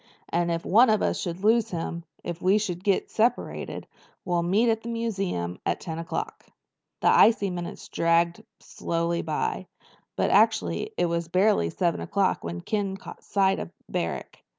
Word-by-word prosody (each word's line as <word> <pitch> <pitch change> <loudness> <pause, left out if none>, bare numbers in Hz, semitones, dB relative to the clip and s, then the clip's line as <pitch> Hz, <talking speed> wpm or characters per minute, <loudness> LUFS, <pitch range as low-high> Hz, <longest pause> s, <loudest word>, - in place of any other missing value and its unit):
"And 170 0 0
if 170 0 -2
one 230 +6 +6
of 215 -1 +3
us - - 0
should 175 +1 -4
lose 225 +1 +3
him—if 170 -1 -6
we 190 +3 +4
should 185 -4 -3
get 200 -2 +1
separated—we'll 220 -6 -2
meet 205 +7 +3
at 225 0 -1
the 235 - -7
museum 195 - -2
at - - -1
ten 165 -2 -5
o'clock." 165 0 -4 0.6
The - - +2
icy 205 -4 +5
minutes 175 -1 -6
dragged 170 0 +1 0.2
slowly 170 0 -2
by. - - -2 0.5
But - - +1
actually 430 - +2
it - - +2
was 170 0 -1
barely 185 - +3
seven 170 - 0
o'clock 200 -2 0
when 85 +1 -5
Ken 200 - -2
caught - - -11
sight 195 -1 +2
of - - -6 0.2
Barrack. - - -4
180 Hz, 155 wpm, -26 LUFS, 170-210 Hz, 0.6 s, one